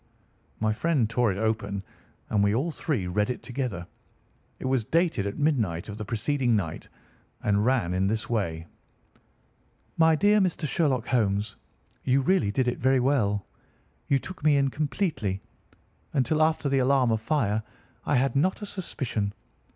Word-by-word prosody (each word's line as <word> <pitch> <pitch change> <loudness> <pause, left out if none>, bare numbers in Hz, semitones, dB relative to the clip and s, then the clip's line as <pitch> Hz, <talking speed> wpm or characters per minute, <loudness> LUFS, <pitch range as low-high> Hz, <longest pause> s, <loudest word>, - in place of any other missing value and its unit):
My 110 0 +1
friend 140 -1 +1
tore 115 0 +1
it 95 - -4
open, 100 -2 -1 0.5
and 105 -2 +3
we 100 +1 +3
all 150 +8 0
three 145 - -2
read 105 +5 0
it 125 - -4
together. 120 -7 -4 0.7
It - - -8
was 130 -3 +1
dated 160 - +1
at 100 - -5
midnight 110 - 0
of 105 +2 -7
the 105 - -4
preceding 120 +2 0
night 80 -6 -3 0.6
and 105 0 +2
ran 115 -10 +1
in 95 +1 +1
this 110 +2 -1
way: 85 -8 -2 1.3
"MY 160 -1 +5
DEAR 205 +6 +4
MR. 175 -5 0
SHERLOCK 135 -6 +1
HOLMES,—You 110 +4 -1
really 135 - +2
did 130 +3 0
it 125 - -1
very 130 +1 +3
well. 115 -7 +1 0.6
You 140 - +3
took 180 +4 -8
me 150 -2 +5
in 140 -1 +2
completely. 145 - -1 0.7
Until 140 +4 +1
after 155 -1 +2
the 135 -1 +2
alarm 130 -2 +3
of 110 -1 0
fire, 110 -4 +1 0.4
I - - +1
had 135 +2 +2
not 185 +9 +1
a - - -2
suspicion. 120 - -3
125 Hz, 160 wpm, -27 LUFS, 105-145 Hz, 1.3 s, MY